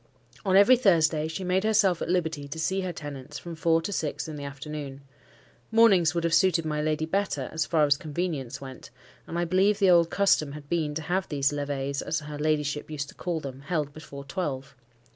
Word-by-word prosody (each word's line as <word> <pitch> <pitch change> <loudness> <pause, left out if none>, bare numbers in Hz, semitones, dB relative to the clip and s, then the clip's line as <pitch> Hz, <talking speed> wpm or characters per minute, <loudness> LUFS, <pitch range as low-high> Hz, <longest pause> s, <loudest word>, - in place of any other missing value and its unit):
On 190 -3 +2
every 245 +6 +7
Thursday 160 -8 +3
she 165 +4 -5
made 185 +1 +1
herself 205 -5 +3
at - - -3
liberty 160 -5 -1
to 140 - -7
see 190 +4 0
her 185 -1 -3
tenants, 145 -2 -8
from 170 - -8
four 165 0 +2
to 205 - -3
six 150 -4 -3
in 155 - -6
the 145 - -7
afternoon. 140 0 -7 0.7
Mornings 200 -8 +5
would 170 - 0
have 170 -1 0
suited 175 -3 +3
my 150 -1 -1
lady 155 0 0
better, 160 -6 -2
as 160 -1 -1
far 155 -3 +3
as 145 -1 +3
convenience 150 -5 -4
went, 130 -3 -10 0.4
and 170 - -4
I 175 - +1
believe 190 +4 +3
the 195 -3 +4
old 170 -1 +5
custom 160 -8 +2
had 145 -1 -10
been 155 -2 -1
to 160 - -3
have 185 +4 -1
these 140 -1 +1
levees 140 -1 -2
(as 160 - -2
her 150 -1 -7
ladyship 150 -1 -1
used 145 -2 -4
to - - -12
call 170 -3 -3
them) 135 -1 -7
held 150 -1 -2
before 140 -2 -9
twelve. 140 -4 -4
155 Hz, 210 wpm, -27 LUFS, 145-180 Hz, 0.7 s, every